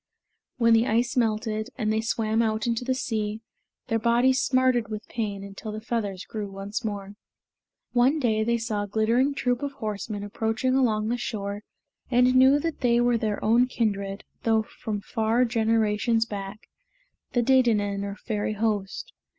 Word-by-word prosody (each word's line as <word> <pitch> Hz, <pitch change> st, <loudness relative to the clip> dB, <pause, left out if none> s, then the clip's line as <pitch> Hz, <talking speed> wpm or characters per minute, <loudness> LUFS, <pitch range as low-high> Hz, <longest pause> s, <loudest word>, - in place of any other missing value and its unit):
When 230 Hz, -2 st, +4 dB
the 225 Hz, +2 st, +4 dB
ice 235 Hz, +3 st, +1 dB
melted, 220 Hz, -1 st, 0 dB
and 215 Hz, -3 st, 0 dB
they 220 Hz, -, +1 dB
swam 225 Hz, 0 st, 0 dB
out 220 Hz, -1 st, 0 dB
into 235 Hz, 0 st, -1 dB
the 260 Hz, +1 st, 0 dB
sea, 215 Hz, -3 st, -2 dB, 0.4 s
their 225 Hz, -, 0 dB
bodies 245 Hz, +3 st, +3 dB
smarted 255 Hz, -3 st, +2 dB
with 215 Hz, 0 st, -6 dB
pain 205 Hz, -4 st, -3 dB
until 200 Hz, +2 st, -7 dB
the 215 Hz, -, -5 dB
feathers 215 Hz, -4 st, -3 dB
grew 210 Hz, -2 st, -5 dB
once 195 Hz, +4 st, -5 dB
more. 200 Hz, -2 st, -4 dB, 0.8 s
One 255 Hz, +5 st, +3 dB
day 220 Hz, -5 st, +1 dB
they 235 Hz, +1 st, +1 dB
saw 225 Hz, -3 st, -2 dB
a 205 Hz, -, -3 dB
glittering 230 Hz, +7 st, +2 dB
troop 245 Hz, -2 st, 0 dB
of 285 Hz, -1 st, -3 dB
horsemen 210 Hz, -3 st, -4 dB
approaching 225 Hz, +4 st, -1 dB
along 220 Hz, -5 st, +2 dB
the 240 Hz, -, 0 dB
shore 205 Hz, -4 st, -4 dB, 0.5 s
and 250 Hz, 0 st, +4 dB
knew 260 Hz, +2 st, +6 dB
that 330 Hz, 0 st, -3 dB
they 240 Hz, -1 st, +3 dB
were 240 Hz, -1 st, +2 dB
their 215 Hz, -2 st, -2 dB
own 235 Hz, +3 st, +4 dB
kindred, 200 Hz, -5 st, -2 dB, 0.2 s
though 220 Hz, -1 st, +2 dB
from 215 Hz, -1 st, -5 dB
far 225 Hz, +3 st, +1 dB
generations 225 Hz, -1 st, +1 dB
back, 200 Hz, -1 st, -7 dB, 0.7 s
the 240 Hz, -, +2 dB
Dedannen 220 Hz, -6 st, +2 dB
or 200 Hz, 0 st, -4 dB
Fairy 210 Hz, 0 st, -3 dB
Host. 210 Hz, -2 st, -2 dB
225 Hz, 165 wpm, -26 LUFS, 210-240 Hz, 0.8 s, knew